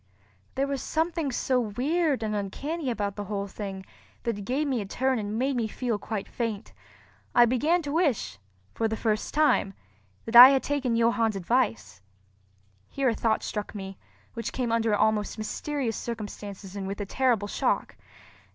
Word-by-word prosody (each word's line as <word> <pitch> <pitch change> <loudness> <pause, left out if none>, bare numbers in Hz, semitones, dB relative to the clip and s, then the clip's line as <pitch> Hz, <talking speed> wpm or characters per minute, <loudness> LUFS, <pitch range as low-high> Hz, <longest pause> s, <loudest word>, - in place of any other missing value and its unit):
There 270 - +1
was 275 -1 -3
something 320 -2 -1
so 255 +1 +1
weird 265 +5 0
and 215 -1 -1
uncanny 275 - -3
about 205 -4 -2
the 205 - -5
whole 200 0 -3
thing 195 -1 -7 0.4
that 235 -2 -1
it 200 - -7
gave 270 +7 0
me 260 -5 0
a - - -5
turn 260 +4 0
and 210 +1 -3
made 265 +3 0
me 235 -2 0
feel 230 -1 -2
quite 210 -2 -4
faint. 230 -3 -4 0.6
I 240 - +8
began 300 +9 +2
to 285 - -4
wish, 285 - 0 0.3
for 225 - 0
the 220 0 -3
first 215 -2 -1
time, 300 -10 +2 0.5
that 225 - -4
I 245 +2 +13
had 270 -1 +2
taken 275 -5 0
Johann's 230 -2 +2
advice. 170 - -1 0.9
Here 270 -2 +1
a - - +1
thought 220 -1 0
struck 210 0 -4
me, 195 -1 -7 0.3
which 230 -1 -4
came 245 -3 -1
under 230 -2 +2
almost 215 0 +1
mysterious 235 +2 -3
circumstances 205 -3 -7
and 195 -1 -4
with 200 +2 -5
a 205 - -2
terrible 230 -2 +1
shock. - - -1
230 Hz, 170 wpm, -27 LUFS, 205-265 Hz, 0.9 s, I